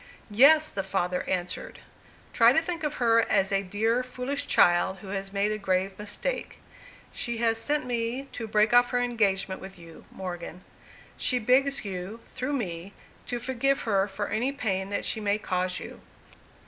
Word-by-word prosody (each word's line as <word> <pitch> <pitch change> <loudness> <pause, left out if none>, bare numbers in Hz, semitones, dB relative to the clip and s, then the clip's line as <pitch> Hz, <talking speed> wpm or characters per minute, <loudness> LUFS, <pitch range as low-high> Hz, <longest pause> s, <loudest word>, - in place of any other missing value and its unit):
"Yes," 305 +8 +6
the 195 - -2
father 185 -2 -1
answered. 180 -1 -3 0.6
"Try 230 +1 +6
to 320 - +3
think 340 -1 -4
of 295 -1 -1
her 230 -2 +4
as 195 -1 +2
a 195 0 +2
dear, 220 +5 0
foolish 255 +2 -4
child 175 +2 +4
who 195 +1 -11
has 195 0 -4
made 200 +1 0
a 215 - -3
grave 190 0 -1
mistake. 355 - -4 0.6
She 235 -1 -2
has 225 -1 +1
sent 290 +4 0
me 240 +1 -2
to 225 - -6
break 215 +1 +2
off 245 0 +6
her 245 - 0
engagement 200 -6 0
with 190 0 -10
you, 165 -1 -14
Morgan. 180 -1 -7 0.5
She 255 - +1
begs 260 +3 +2
you, 190 +3 -5
through 260 +2 -3
me, 190 -6 -4 0.3
to 245 - -2
forgive 265 +2 0
her 200 -3 +1
for 205 +1 -4
any 245 +5 0
pain 195 -8 -2
that 205 - -2
she - - 0
may 205 -1 +1
cause 185 -3 -1
you. - - -10
215 Hz, 175 wpm, -27 LUFS, 190-250 Hz, 0.6 s, Yes